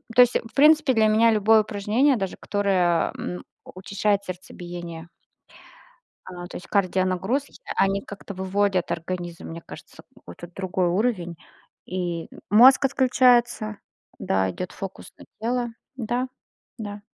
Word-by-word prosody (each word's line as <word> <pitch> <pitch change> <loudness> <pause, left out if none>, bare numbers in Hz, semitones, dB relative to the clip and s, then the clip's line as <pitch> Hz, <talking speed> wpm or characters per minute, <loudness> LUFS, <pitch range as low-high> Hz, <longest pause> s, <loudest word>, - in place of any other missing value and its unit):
то 250 - +8
есть 245 0 +5
в 225 - -13
принципе 300 -1 +5
для 220 -2 +4
меня 225 +2 +4
любое 220 +1 +5
упражнение, 215 +6 +1
даже 195 -3 -3
которое, 185 -5 +1
м, 180 - -5 0.2
учащает 200 +2 -1
сердцебиение. 175 -2 -8 1.2
А, 175 -1 -8
то - - -12
есть 180 - -12
кардионагрузки, 190 +6 0 0.2
они 195 +1 +2
как-то 200 0 -9
выводят 190 -1 0
организм, 175 0 -5
мне 165 +1 -7
кажется, - - -13
какой-то 85 - -11
другой 185 0 -2
уровень, 180 -2 0 0.5
и 175 -2 -3 0.2
мозг 255 +7 +7
отключается, 245 -5 +3 0.4
да. 95 -1 0
Идёт 180 - -6
фокус 195 -1 -8
на - - -14
тело, 240 +2 -1 0.3
да, 245 +1 -2 0.5
да. 205 -2 -7
200 Hz, 125 wpm, -24 LUFS, 180-230 Hz, 1.2 s, то